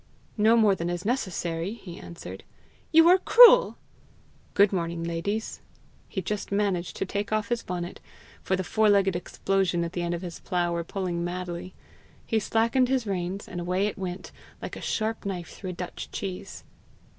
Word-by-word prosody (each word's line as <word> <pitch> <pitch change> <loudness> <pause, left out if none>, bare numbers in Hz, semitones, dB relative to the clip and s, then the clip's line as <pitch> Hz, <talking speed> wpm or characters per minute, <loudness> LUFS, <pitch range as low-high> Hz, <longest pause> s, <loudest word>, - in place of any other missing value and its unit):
"No 220 +2 +5
more 215 -3 +5
than 170 -2 -3
is 175 +1 -4
necessary," 185 -6 -2
he 180 -7 -10
answered. 170 - -9 0.5
"You 325 +1 +7
are 365 +2 +7
cruel!" - - +7 0.8
"Good 200 0 +5
morning, 170 -2 -2
ladies." 170 +6 -3 0.5
He 190 - -3
just 210 +3 -3
managed 200 -4 0
to - - -2
take 205 +2 -3
off 215 -1 0
his 240 -1 0
bonnet, 175 0 -5 0.4
for 190 - 0
the 190 - -2
four 215 +3 +2
legged 195 -2 +3
explosions 175 -1 0
at 170 - -6
the 175 - -2
end 175 0 -1
of 170 - -7
his 175 -2 -6
plough 175 -2 -1
were 170 0 -1
pulling 175 -1 -3
madly. 180 0 -5 0.5
He 225 - +1
slackened 230 +4 +2
his 260 -3 +1
reins, 190 0 -3
and 175 -1 -5
away 180 +3 0
it 210 - -2
went, 185 -1 -6 0.3
like - - -6
a - - -8
sharp 220 0 -2
knife 180 -4 -4
through 190 - -7
a - - -4
Dutch 180 0 -6
cheese. 190 -2 -6
190 Hz, 180 wpm, -27 LUFS, 175-210 Hz, 0.8 s, You